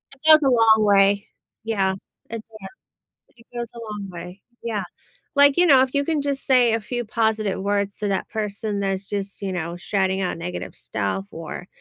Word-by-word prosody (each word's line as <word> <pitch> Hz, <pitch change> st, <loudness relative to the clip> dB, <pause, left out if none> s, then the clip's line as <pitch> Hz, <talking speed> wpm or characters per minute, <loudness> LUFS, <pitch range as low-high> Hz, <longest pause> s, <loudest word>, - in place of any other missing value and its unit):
It 265 Hz, -, -31 dB
goes 310 Hz, 0 st, +9 dB
a -, -, 0 dB
long 220 Hz, -3 st, +5 dB
way. 200 Hz, 0 st, +4 dB, 0.4 s
Yeah, 195 Hz, -4 st, 0 dB, 0.4 s
it 230 Hz, -1 st, -5 dB
does, 215 Hz, -4 st, -11 dB, 0.7 s
it 230 Hz, -, -20 dB
goes 235 Hz, -1 st, -4 dB
a -, -, -10 dB
long 200 Hz, -2 st, -6 dB
way, 180 Hz, +2 st, -9 dB, 0.2 s
yeah. 215 Hz, -5 st, -2 dB, 0.5 s
Like, 285 Hz, +1 st, +6 dB
you 355 Hz, -, +5 dB
know, 270 Hz, -5 st, +7 dB
if 260 Hz, +1 st, 0 dB
you 280 Hz, 0 st, +1 dB
can 315 Hz, -3 st, 0 dB
just 280 Hz, -1 st, -2 dB
say 245 Hz, -3 st, +5 dB
a 225 Hz, -, +1 dB
few 240 Hz, +2 st, -4 dB
positive 220 Hz, -3 st, 0 dB
words 200 Hz, 0 st, -1 dB
to 210 Hz, -, -2 dB
that 195 Hz, -1 st, -2 dB
person 210 Hz, -1 st, -3 dB
that's 195 Hz, 0 st, -2 dB
just, 200 Hz, 0 st, -4 dB
you 195 Hz, -1 st, -3 dB
know, 170 Hz, -1 st, -3 dB
shouting 190 Hz, +1 st, -1 dB
out 180 Hz, -2 st, -2 dB
negative 175 Hz, +2 st, -5 dB
stuff 110 Hz, -, -3 dB
or, 165 Hz, +2 st, -8 dB
205 Hz, 195 wpm, -23 LUFS, 195-235 Hz, 0.7 s, goes